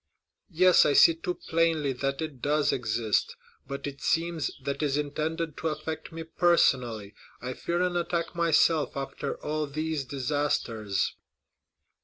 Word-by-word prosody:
"Yes, 180 +1 +5
I 145 - +2
see 165 - +7
too 175 +2 -4
plainly 160 -4 0
that 135 +3 -2
it 145 -6 -7
does 150 0 +2
exist. 110 -3 0 0.3
But 140 0 -5
it 140 -1 -6
seems 165 -1 0
that 140 0 -2
it - - -3
is 145 -1 +1
intended 155 +2 -2
to 165 - -2
affect 155 +1 -4
me 165 0 -6
personally. 125 - +2 0.3
I 125 +1 -5
fear 175 +6 -1
an 180 -1 -1
attack 170 -1 -1
myself, 165 -3 +2
after 135 0 -4
all 155 0 -1
these 155 0 -2
disasters." 125 -7 -1
150 Hz, 145 wpm, -28 LUFS, 135-165 Hz, 0.3 s, see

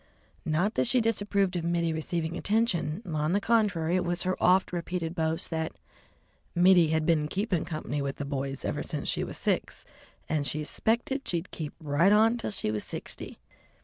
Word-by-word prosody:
Not 175 +8 +1
that - - +1
she 255 +1 +3
disapproved 205 -4 +1
of 170 - -1
Mittie 170 -1 0
receiving 160 +1 -2
attention; 200 -5 0
on 155 -1 -1
the 200 - +3
contrary, 195 -7 +2
it 185 - +2
was 175 0 0
her 185 0 0
oft 185 0 +4
repeated 170 -1 -3
boast 160 0 -1
that 160 -1 -2 0.8
"Mittie 175 -1 +6
had 160 0 +1
been 155 -3 +2
keepin' 195 0 -1
company 155 -3 -3
with 140 -1 -2
the 145 - -5
boys 135 -1 -4
ever - - -1
since - - -4
she - - +1
was - - -5
six, - - -2 0.4
and 150 -3 0
she 155 0 -1
'spected 240 - -1
she'd 170 +1 -2
keep 155 -3 -6
right 155 +5 +3
on 225 +3 +4
till - - -3
she 200 - -2
was 105 -1 -1
sixty." - - -7
170 Hz, 180 wpm, -28 LUFS, 155-200 Hz, 0.8 s, Mittie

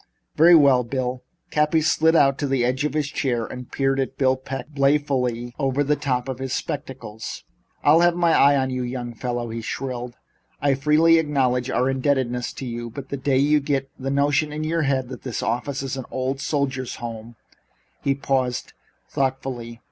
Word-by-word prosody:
"Very 170 +3 +7
well, 140 -5 +5
Bill." 125 +1 -3 0.3
Cappy 150 +1 +2
slid 160 +2 +3
out 140 -3 +4
to 145 - -1
the 135 -3 +1
edge 130 +3 0
of 150 - -2
his 150 -2 0
chair 125 -5 -1
and 125 +1 -9
peered 135 0 +1
at 135 0 -2
Bill 130 -1 +3
Peck 135 +3 -7
balefully 135 -4 +1
over 135 0 +1
the 150 +1 +2
top 130 -3 -2
of 130 -1 -4
his 130 -1 -3
spectacles. 115 -6 -5 0.4
"I'll 150 +3 +6
have 175 0 +4
my 170 -2 +3
eye 140 -1 +5
on 130 -1 0
you, 130 0 -2
young 120 -1 -4
feller," 120 0 -3
he 115 - -4
shrilled. 125 0 -5 0.4
"I 140 -1 +2
freely 155 +4 +4
acknowledge 130 -5 0
our 125 0 +1
indebtedness 130 -2 0
to 135 - -7
you, 120 -1 -5
but 135 +3 -9
the - - -2
day 135 0 +1
you 150 +2 +4
get 140 -1 -2
the 135 +1 -3
notion 145 +2 +1
in 155 +1 -4
your 165 +1 0
head 135 -3 0
that 130 - -8
this 125 -4 -4
office 130 +4 -2
is 135 -1 -3
an 130 - -5
old 130 +1 -2
soldiers' 135 -4 -2
home 115 0 -7 0.4
" - - -41
He 135 -1 +2
paused 130 -3 -1 0.3
thoughtfully. 130 -3 -3
135 Hz, 190 wpm, -23 LUFS, 125-145 Hz, 0.4 s, Very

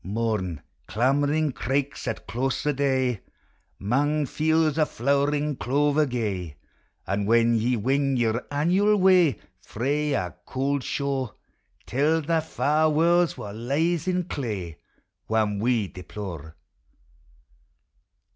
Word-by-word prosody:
3G;> - - -8
Mourn, 105 -8 -2 0.3
clamoring 145 +7 +1
eraiks 135 +2 -2
at 115 - -4
close 130 +6 -2
o* 150 - +3
day, 130 -5 0 0.6
'Mang 145 +8 +1
fields 160 +2 +1
o' 155 - +4
flowering 145 +3 0
clover 145 +6 +1
gay; 100 - -3 0.5
And 100 +1 -1
when 115 +1 +4
ye 115 +2 +1
wing 135 +4 +1
your 115 0 0
annual 180 +9 +2
way 185 - +4 0.2
Frae 140 +9 -1
our 90 -5 -2 0.2
cauld 140 +1 -1
shore, 135 -5 -2 0.5
Tell 150 +5 +1
thae 165 +2 +1
far 155 +1 +1
warlds 170 +3 +3
wha 100 - -6
lies 150 - -1
in 180 -1 +1
clay, 105 - -5 0.5
Wham 110 -2 +1
we 115 -2 +1
deplore. 90 -4 -8
135 Hz, 120 wpm, -25 LUFS, 110-150 Hz, 0.6 s, o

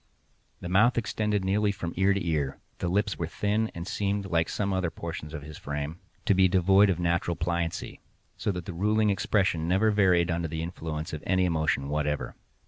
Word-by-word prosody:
The - - -5
mouth 105 +8 +4
extended 105 -3 0
nearly 100 +2 +2
from 85 -4 -5
ear 95 +2 +3
to 100 -2 0
ear, 75 -4 -1 0.2
the 90 - -1
lips 100 +2 0
were 85 - -1
thin, 105 +5 0
and 85 0 -5
seemed, 100 0 -1
like 85 -3 +1
some 100 -2 -1
other 95 -2 0
portions 80 -2 -6
of 75 -3 -6
his 75 0 -9
frame, 75 +3 -4 0.3
to - - +4
be 95 0 +5
devoid 95 +2 +5
of 90 -3 0
natural 85 0 0
pliancy, 85 0 -2 0.4
so - - -1
that 90 -3 -5
the 95 - -5
ruling 105 +4 +2
expression 95 -4 +1
never 95 +5 +3
varied 90 -4 +3
under 85 0 -1
the 80 0 -4
influence 80 -1 -5
of 75 - -5
any 95 0 +3
emotion 80 -5 0
whatever. 75 0 -1
90 Hz, 195 wpm, -28 LUFS, 80-100 Hz, 0.4 s, be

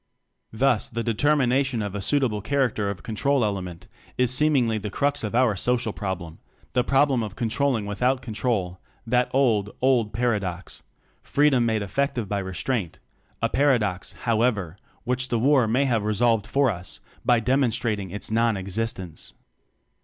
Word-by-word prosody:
Thus, 120 0 +1
the 115 0 -3
determination 130 0 +1
of 100 -2 -4
a 105 - -4
suit 140 +8 +1
able 105 -5 -1
character 120 -5 0
of 100 - -6
"control" 130 +3 +1
element 95 -1 -4 0.3
is 125 -1 +2
seemingly 130 -6 +2
the 105 +1 -5
crux 140 +6 -1
of 105 +1 -3
our 120 -4 +3
social 120 +1 0
prob 95 -3 -3
lem; 80 -1 -11 0.3
the 125 - +2
problem 135 -1 +3
of 105 -3 -5
controlling 120 0 0
with. 105 +2 -6
out 130 +1 +3
control, 110 -6 -2 0.3
that 125 +2 +1
old, 115 -7 +2
old 125 -5 +2
paradox: 100 -6 -2 0.4
Freedom 140 -5 +2
made 110 -2 0
effective 125 +2 -1
by 100 +1 -1
restraint 95 +1 -3 0.5
a - - +4
paradox, 115 -10 +1
however, 110 -7 +1 0.3
which 125 +1 -1
the 120 - +1
war 130 0 +3
may 125 +6 +2
have 115 -5 +1
resolved 110 0 +1
for 135 -3 +2
us, 90 -2 -7 0.2
by 120 -1 +4
demon 130 +2 +2
strating 105 -4 -2
its 105 +2 -5
non 115 -1 +2
existence. 95 -3 -3
115 Hz, 160 wpm, -24 LUFS, 105-130 Hz, 0.5 s, a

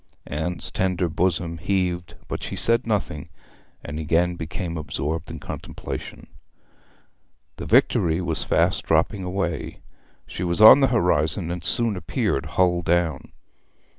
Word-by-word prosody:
Anne's 80 +4 -4
tender 90 -1 0
bosom 85 0 -1
heaved, 90 -2 -1
but - - -4
she - - -5
said 115 +1 +2
nothing, 100 -9 -2 0.6
and 75 +2 -5
again 85 +3 +1
became 85 +1 -5
absorbed 75 +1 -4
in 80 - -6
contemplation. - - -7 1.3
The - - -6
Victory 80 0 +3
was 90 - -2
fast - - +1
dropping 95 - +1
away. 90 -4 -3 0.4
She 90 - -6
was 85 +1 -1
on 110 +6 +10
the 135 - +4
horizon, 90 - +1
and 90 -1 -5
soon 115 +5 +2
appeared 90 -6 -2
hull 90 -1 +3
down. 85 -4 0
85 Hz, 130 wpm, -23 LUFS, 80-95 Hz, 1.3 s, on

